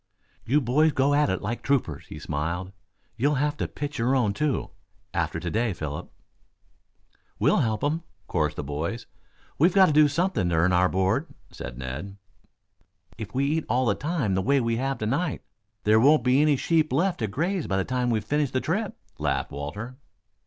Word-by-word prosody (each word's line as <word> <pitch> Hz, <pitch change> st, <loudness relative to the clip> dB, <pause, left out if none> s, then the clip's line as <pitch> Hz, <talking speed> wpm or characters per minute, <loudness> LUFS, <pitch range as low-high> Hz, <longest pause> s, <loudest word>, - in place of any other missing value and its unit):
"You 145 Hz, +6 st, +3 dB
boys 145 Hz, +5 st, +3 dB
go 140 Hz, +2 st, +2 dB
at 145 Hz, 0 st, +3 dB
it 95 Hz, -, -2 dB
like 115 Hz, +4 st, -3 dB
troopers," 125 Hz, -, -1 dB
he -, -, -9 dB
smiled. 85 Hz, +5 st, -3 dB, 0.5 s
"You'll 145 Hz, +5 st, +2 dB
have 145 Hz, +2 st, 0 dB
to -, -, -2 dB
pitch 145 Hz, -2 st, -5 dB
your 125 Hz, +4 st, +2 dB
own, 115 Hz, -6 st, +2 dB
too, 150 Hz, +3 st, -1 dB, 0.4 s
after 85 Hz, -1 st, -1 dB
to 85 Hz, 0 st, -4 dB
day, 115 Hz, -1 st, 0 dB
Philip." 75 Hz, -4 st, -6 dB, 1.3 s
"We'll -, -, +3 dB
help 110 Hz, -2 st, 0 dB
him," 155 Hz, +3 st, 0 dB, 0.3 s
chorused 75 Hz, -3 st, 0 dB
the -, -, -4 dB
boys. 80 Hz, -, -4 dB, 0.5 s
"We've 170 Hz, +5 st, +4 dB
got 190 Hz, -1 st, +8 dB
to 155 Hz, -, +2 dB
do 150 Hz, 0 st, +6 dB
something 145 Hz, -, 0 dB
to 85 Hz, -, +1 dB
earn 85 Hz, +3 st, +3 dB
our 90 Hz, +1 st, +4 dB
board," 95 Hz, +1 st, +1 dB, 0.2 s
said -, -, -8 dB
Ned. 70 Hz, +10 st, -6 dB, 1.0 s
"If 110 Hz, +2 st, -7 dB
we 135 Hz, +1 st, +2 dB
eat 155 Hz, +2 st, 0 dB
all 125 Hz, +3 st, +2 dB
the 105 Hz, -, +3 dB
time 145 Hz, -, -1 dB
the 95 Hz, -, +1 dB
way 140 Hz, +7 st, +3 dB
we 115 Hz, -2 st, 0 dB
have 135 Hz, +2 st, -1 dB
tonight, 140 Hz, +9 st, -1 dB, 0.4 s
there 110 Hz, +1 st, +5 dB
won't 145 Hz, +6 st, +5 dB
be 125 Hz, +2 st, +4 dB
many 150 Hz, -1 st, +4 dB
sheep 160 Hz, +2 st, +1 dB
left 175 Hz, +7 st, +1 dB
to 110 Hz, -, 0 dB
graze 170 Hz, -, -1 dB
by 95 Hz, -, 0 dB
the 95 Hz, -, 0 dB
time 125 Hz, -1 st, 0 dB
we've 110 Hz, -3 st, 0 dB
finished 145 Hz, -3 st, 0 dB
the 130 Hz, -, +2 dB
trip," 195 Hz, +9 st, -2 dB, 0.2 s
laughed -, -, -1 dB
Walter. 80 Hz, -, -6 dB
125 Hz, 190 wpm, -26 LUFS, 95-145 Hz, 1.3 s, got